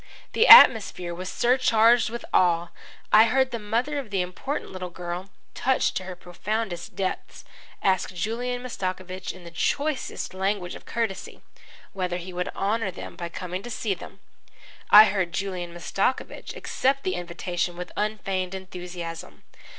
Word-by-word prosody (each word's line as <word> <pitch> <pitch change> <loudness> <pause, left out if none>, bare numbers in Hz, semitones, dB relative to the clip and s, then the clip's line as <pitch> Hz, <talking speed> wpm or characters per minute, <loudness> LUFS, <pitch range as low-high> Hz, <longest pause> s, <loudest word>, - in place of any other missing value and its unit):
The 460 - +4
atmosphere 200 - +8
was 185 +2 -6
surcharged 240 -2 +4
with 235 +1 -6
awe. 175 -1 +3 0.4
I 215 +1 +9
heard 260 +3 +2
the 235 - -3
mother 240 +8 -1
of 260 -6 -7
the 195 -3 0
important 180 +11 -5
little 185 -1 -6
girl, 175 +2 -6 0.2
touched 265 0 +1
to 185 - -5
her 185 -1 -6
profoundest 180 0 -4
depths, 190 -1 -4 0.4
ask 190 -1 +1
Julian 240 +7 -3
Mastakovich 185 -5 -4
in 185 - -13
the 170 - -10
choicest 280 - -2
language 190 -1 -2
of - - -12
courtesy, 225 -5 -4 0.5
whether 180 -2 -2
he 180 +1 -8
would 180 +1 -2
honour 205 +1 0
them 185 - -8
by 170 -1 -5
coming 180 +2 -5
to 240 - -8
see 220 -3 -2
them. 175 - -11 0.7
I 210 +1 +11
heard 190 -4 -1
Julian 180 -2 -3
Mastakovich 195 +8 -2
accept 275 +1 0
the 185 - -1
invitation 175 0 -3
with 180 - -6
unfeigned 195 -3 -2
enthusiasm. 180 -3 -8
190 Hz, 150 wpm, -25 LUFS, 180-225 Hz, 0.7 s, I